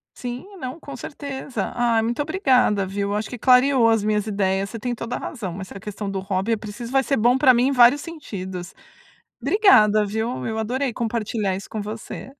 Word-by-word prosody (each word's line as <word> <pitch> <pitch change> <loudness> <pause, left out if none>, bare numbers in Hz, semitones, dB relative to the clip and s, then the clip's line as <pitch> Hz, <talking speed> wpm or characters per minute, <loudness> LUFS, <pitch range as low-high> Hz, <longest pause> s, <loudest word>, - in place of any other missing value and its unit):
Sim, 245 +5 -6
não, 260 +2 -6
com 280 -3 -9
certeza. 265 -4 -5
Ah, 235 -2 +2
muito 240 +5 -1
obrigada, 260 - +2
viu. 200 +1 -3
Eu 205 - -1
acho 210 +1 -2
que 245 - -6
clareou 250 -1 +5
as 225 -2 +2
minhas 210 0 0
ideias, 195 -1 0
você 230 - -6
tem 245 +2 -2
toda 230 +1 -4
a - - -4
razão, 195 - -6
essa 190 +1 -8
questão 205 0 -6
do 195 - -3
hobby 195 +3 -2
eu 225 - +2
preciso 215 +3 -8
vai 270 0 +3
ser 275 - 0
bom 240 +4 +4
pra 260 -2 +6
mim 245 +2 +3
em - - +1
vários 250 +2 +6
sentidos. 190 - -7 0.7
Obrigada, 215 - +5
viu, 220 +4 -3
eu 220 0 -3
adorei 250 +3 -1
compartilhar 220 -4 -2
isso 195 - -8
com 215 - -4
você. 215 +2 -7
230 Hz, 205 wpm, -23 LUFS, 205-255 Hz, 0.7 s, pra